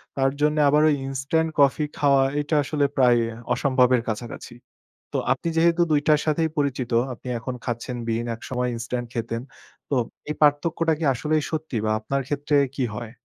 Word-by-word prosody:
তার 135 0 +2
জন্যে 150 0 +3
আবার 150 +1 +4
ওই 150 - +3
ইনস্ট্যান্ট 140 +5 0
কফি 140 +2 +4
খাওয়া 140 -2 +4 0.2
এটা 150 +1 -1
আসলে 145 +1 0
প্রায় 125 -2 +5 0.3
অসম্ভবের 125 -1 +3
কাছাকাছি। 115 +2 -6 0.6
তো - - 0
আপনি 170 - -3
যেহেতু 170 +1 +4
২ 150 -1 +4
টার 150 -1 +5
সাথেই 160 +1 +1
পরিচিত 135 -4 -1 0.2
আপনি 125 - -9
এখন 125 +2 -5
খাচ্ছেন 120 +1 -4
বিন 115 +1 -1
একসময় 125 +1 -3
ইনস্ট্যান্ট 120 +1 -4
খেতেন। 115 0 -3 0.5
তো - - +1 0.4
এই - - -1
পার্থক্যটা 160 +2 +2
কি 165 - -3
আসলেই 155 +4 0
সত্যি 155 -5 -3
বা 110 - +1
আপনার 135 +5 -2
ক্ষেত্রে 145 0 0 0.2
কি 135 - 0
হয়? 115 -1 -6
140 Hz, 170 wpm, -24 LUFS, 125-150 Hz, 0.6 s, প্রায়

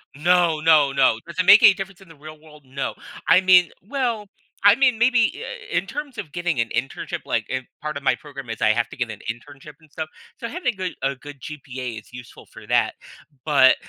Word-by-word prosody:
No, 170 +1 +3
no, 155 -3 +5
no. 135 -4 +3
Does 170 0 -10
it 185 - +2
make 205 +3 +9
any 215 -3 +8
difference 195 0 -8
in 190 - -17
the 165 - -14
real 155 +1 -12
world? 150 -2 -17
No, 135 +1 -4 0.3
I 185 - +6
mean, 185 -2 +6 0.2
well, 235 -5 -2 0.4
I 205 +1 +8
mean, 255 -2 +3
maybe 235 0 +3 0.4
i - - -3
i - - +4
in 180 - 0
terms 285 +2 -7
of 150 - -6
getting 175 -5 -2
an 115 0 0
internship, 135 - -3
like, - - -1
in 130 -1 -3 0.2
part 150 -1 -4
of 140 - -6
my - - +3
program 140 -4 -10
is 115 0 -6
I 110 - +4
have 115 +1 +1
to - - -11
get 120 -3 -2
an 105 - -9
internship 140 +5 -13
and 155 -1 -22
stuff. 160 0 -5 0.3
So 235 - -4
having 270 - -2
good 185 -1 -4
a 135 +1 0
good 145 +1 -12
GPA 130 -6 -7
is - - -23
useful 125 -2 -12
for - - -14
that, - - +2 0.5
but 140 -4 +6
155 Hz, 230 wpm, -22 LUFS, 135-195 Hz, 0.5 s, make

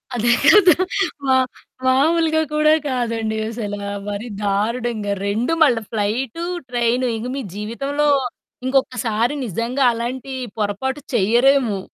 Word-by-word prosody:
అదే 240 +1 +2
కదా! 390 -5 +7 0.5
మా 265 -1 +4 0.5
మామూలుగా 315 +5 +3
కూడా 305 0 +4 0.2
కాదండి 230 -3 -2
అసల 220 -3 -4 0.3
మరీ 205 +4 -4 0.2
దారుణంగా 215 +1 -1
2 230 +10 0
మళ్ళ, 265 -6 +4 0.2
ఫ్లైటు, 225 +8 -2 0.3
ట్రైను 245 +1 +1
ఇక 230 - -5
మీ 275 - -3
జీవితంలో 275 +8 -2 0.6
ఇంకొకసారి 250 -3 0
నిజంగా 235 +7 -1
అలాంటి 245 +3 -4 0.3
పొరపాటు 220 +7 -2 0.2
చెయ్యరేమో. 235 +1 +3
240 Hz, 105 wpm, -20 LUFS, 220-270 Hz, 0.6 s, కదా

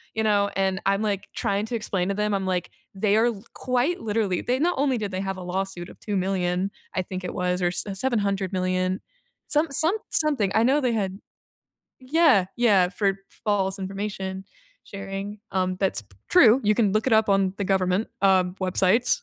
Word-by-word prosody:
you 220 - 0
know, 205 -2 +2
and 190 0 0
I'm, 195 +1 +2
like, 200 -2 -2
trying 200 +1 0
to 235 - -3
explain 195 -4 -1
to 200 - -1
them, 210 0 0
I'm 195 -1 -1
like, 180 -1 -2 0.2
they 200 +1 +2
are 225 +2 +4
l 215 -4 -4
quite 255 +7 0
literally 210 -4 0
they 250 +1 0
not 350 +4 +2
only 270 -2 +1
did 205 -3 -3
they 185 0 -3
have 195 -1 -3
a 185 - -7
lawsuit 180 -1 -4
of - - -15
2,000,000, 190 -1 -1 0.2
I 185 - +1
think 185 +1 -6
it 180 - -4
was 180 0 -1
or 175 - +2
s 175 - -2
700,000,000 190 -4 -1 0.5
some 300 +2 +2
some 320 +7 +2 0.2
something, 285 -11 +1
I 220 - +5
know 270 +5 +3
they 250 -2 +1
had 195 -3 -2 0.8
Yeah, 260 - +4
yeah, 200 -7 +4
for 195 0 0 0.3
false 195 -2 0
information 195 0 -4 0.4
sharing, 195 +1 -6
um, 185 -1 0
that's 190 - 0
p 100 -2 -24
true, 255 -7 +6
you 210 +1 +4
can 210 -3 +2
look 215 +4 0
it - - 0
up 220 0 +3
on 195 -1 +2
the 200 - -1
government, 190 +1 +1
uh, 190 -2 +5 0.2
websites. 190 +6 +2
195 Hz, 190 wpm, -25 LUFS, 190-220 Hz, 0.8 s, true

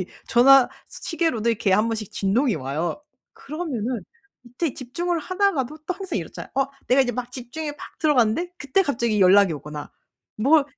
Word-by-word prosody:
알람이 185 - -3 0.2
전화 265 +1 +7 0.2
시계로도 320 -10 -1
이렇게 215 -4 +1
한번씩 215 0 +1
진동이 220 - +1
와요. 150 - -3 0.3
그러면은 260 - -4 0.4
이때 250 +4 -3
집중을 340 +7 -2
하다가도 315 -5 0
또 365 - -1
항상 375 - -4
이렇잖아요. 165 - -8
어 270 0 +2 0.2
내가 260 +2 +5
이제 245 -1 -1
막 245 +1 -5
집중이 290 +5 -5
팍 - - -12
들어갔는데 300 +4 +2
그때 295 +7 +2
갑자기 235 - 0
연락이 190 -1 +6
오거나 150 +1 -8 0.4
뭐 280 +6 +4
250 Hz, 380 characters per minute, -23 LUFS, 215-310 Hz, 0.4 s, 전화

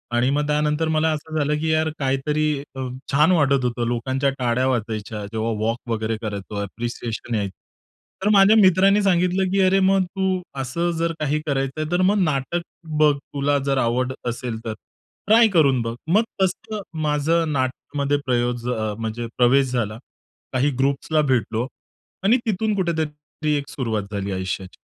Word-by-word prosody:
आणि 125 +2 +3
मग 145 +1 0
त्यानंतर 150 +1 +1
मला 160 0 +2
अस 150 - -2 0.2
झाल 150 0 +1
की 160 0 -1
यार 160 0 +2
काही 135 0 +1
तरी 155 +1 +1 0.3
अ, 130 - -6 0.3
छान 150 +6 +4
वाटत 140 -6 +3
होतं. 120 -1 -1
लोकांच्या 130 +3 0
टाळ्या 125 +1 +1
वाजायच्या 110 -3 -2
जेव्हा 110 +1 -1
वॉक 115 +1 0
वगैरे 110 0 -1
करायचो 100 -1 -4
ऍप्रिसिएशन 115 +2 -4
यायचं. 100 -3 -1 0.7
तर 210 - +3
माझ्या 200 +2 +7
मित्रांनी 195 +1 +5
सांगितलं 180 0 +2
की 195 - +1
"अरे 190 +1 +4
मग 190 0 +3
तू 190 0 -1 0.2
अस 135 +1 -5 0.3
जर 165 0 0
काही 150 0 0
करायचं 135 +1 -1
आहे 155 - -3
तर 175 +1 +2
मग 200 +2 +3
नाटक 150 +3 -1 0.4
बघ 150 -1 +6
तुला 140 +1 -1
जर 135 -1 +1
आवड 125 +1 +1 0.2
असेल 120 -1 -4
तर, 110 - -2 0.5
ट्राय 225 +1 +7
करून 140 -7 +4
बघ." 115 0 -3 0.2
मग 215 +3 +5 0.2
तसं 210 +3 -1 0.2
माझ 150 0 0
नाटकमध्ये 145 -2 0
प्रयोग 120 -1 +1
प्रवेश 110 -4 -2
म्हणजे 115 +1 -3
प्रवेश 130 +1 +4
झाला. 110 -3 -1 0.6
काही 135 +3 +2
ग्रुप्सला 140 +3 +1
भेटलो 115 +1 -1 0.6
आणि 225 +6 +5
तिथून 215 0 0
कुठे 180 -3 0
तरी 150 0 -4
एक 140 0 -5
सुरुवात 115 -7 -2
झाली 100 0 -3
आयुष्याची. 95 0 -4
140 Hz, 165 wpm, -22 LUFS, 120-165 Hz, 0.7 s, माझ्या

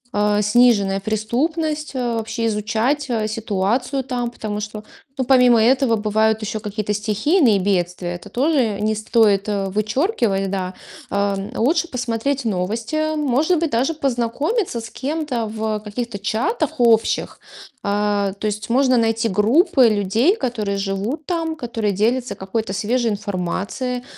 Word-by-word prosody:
э, 210 0 +2
сниженная 210 -3 +3
преступность, 300 - -1
э, 245 -3 -1
вообще 225 +1 -2
изучать, 225 +7 0
э, 220 -3 0
ситуацию 225 +5 -1
там. 245 -2 -2
Потому 215 -3 -5
что, 210 0 -6 0.3
ну, 260 - +1
помимо 250 -2 +5
этого 255 0 +3
бывают 220 +1 +1
ещё 215 +1 -3
какие-то 210 0 -3
стихийные 215 - +2
бедствия, 180 -2 -1
это 180 +4 -10
тоже 245 -4 +1
не 215 +1 +1
стоит 215 -2 +2
вычёркивать, 210 - 0
да. 185 -2 -3 0.4
А, 200 0 0 0.2
лучше 320 +8 +1
посмотреть 250 +1 -2
новости, 230 +11 -1
может 300 +4 +1
быть, 330 -2 -1
даже 260 +8 +1
познакомиться 275 - -1
с 230 - -8
кем-то 275 -4 -3
в 215 0 -2
каких-то 220 0 -5
чатах 310 - -1
общих. 230 -2 +2 0.5
А, 205 -1 +1
то - - -4
есть 210 +1 -4
можно 255 +1 +3
найти 225 0 +1
группы 255 - +4
людей, 215 - +2
которые 215 - -2
живут 200 +10 -3
там, 330 -2 -2
которые 230 -6 -2
делятся 235 +6 0
какой-то 195 +3 -3
свежей 230 +3 0
информацией, 205 +5 -3
225 Hz, 135 wpm, -20 LUFS, 210-260 Hz, 0.5 s, помимо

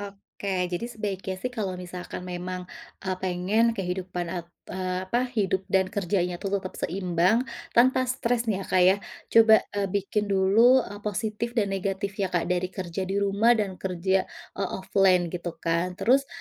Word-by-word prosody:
Oke, 200 0 -8 0.2
jadi 175 +7 -2
sebaiknya 195 -4 -4
sih 250 - -1
kalau 195 -4 -2
misalkan 180 0 -7
memang, 180 0 -5 0.4
eee, 185 0 0
pengen 185 +5 +1
kehidupan, 180 -1 -3
eee, 180 +1 -5
apa, 240 +5 +1 0.2
hidup 190 -2 +1
dan 190 -1 +3
kerjanya 180 -2 0
tuh 195 - -2
tetap 185 -1 -8
seimbang 185 +6 +1 0.2
tanpa 255 +2 +4
stres 245 -2 0
nih, 195 - 0
ya, - - -5
Kak, 185 -1 +4
ya, 190 - +5 0.3
coba, 225 -1 +7 0.2
eee, 200 -1 -1
bikin 205 +1 0
dulu, 210 +6 +5
eee, 205 0 -8
positif 215 +3 -2
dan 205 -4 +1
negatifnya, 195 0 -2
Kak, 175 - +2
dari 180 0 +1
kerja 185 -1 -5
di 195 - -3
rumah 205 +4 +4
dan 200 -4 -2
kerja, 190 +1 0 0.3
eee, - - 0
offline, 185 -2 +3
gitu 175 0 -4
kan. 170 +2 0
Terus 270 +8 +3
190 Hz, 160 wpm, -26 LUFS, 180-210 Hz, 0.4 s, coba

